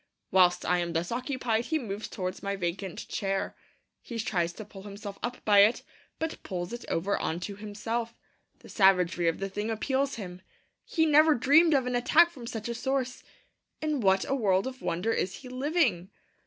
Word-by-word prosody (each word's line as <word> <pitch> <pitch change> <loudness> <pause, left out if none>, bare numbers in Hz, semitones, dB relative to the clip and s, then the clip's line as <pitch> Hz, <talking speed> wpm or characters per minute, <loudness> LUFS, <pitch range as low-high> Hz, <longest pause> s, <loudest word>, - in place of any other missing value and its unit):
Whilst 180 -1 +4
I 180 0 +2
am 170 -1 -2
thus 170 +1 -1
occupied, 245 -2 -1
he 320 - 0
moves 215 -6 -5
towards 185 -2 -4
my 200 0 -2
vacant 185 0 -4
chair. 195 -1 -2 0.5
He 235 - -7
tries 175 -6 0
to 215 - -9
pull 195 -1 -12
himself 200 0 -8
up 245 +1 -5
by 205 -1 +6
it, 210 +4 +5 0.3
but 320 0 -4
pulls 180 +2 -5
it 240 - -6
over 195 +5 0
on 160 - -2
to 200 +3 -5
himself. 225 +3 -4 0.5
The - - -14
savagery 180 -4 +3
of 165 - +1
the 195 - -3
thing 210 +3 -4
appals 265 +5 0
him; 185 -5 -8 0.4
he 320 -2 +1
never 310 0 +6
dreamed 300 +6 +5
of 265 -2 +2
an 250 - -2
attack 325 +8 +5
from 250 -7 -10
such 225 -2 -5
a 235 - -2
source. 255 +1 -2 0.6
In 305 -2 -1
what 190 -3 +3
a - - 0
world 195 -7 +2
of 260 0 -6
wonder 180 +7 -1
is 185 +1 -1
he 255 - -10
living! 255 - 0
215 Hz, 190 wpm, -29 LUFS, 190-255 Hz, 0.6 s, by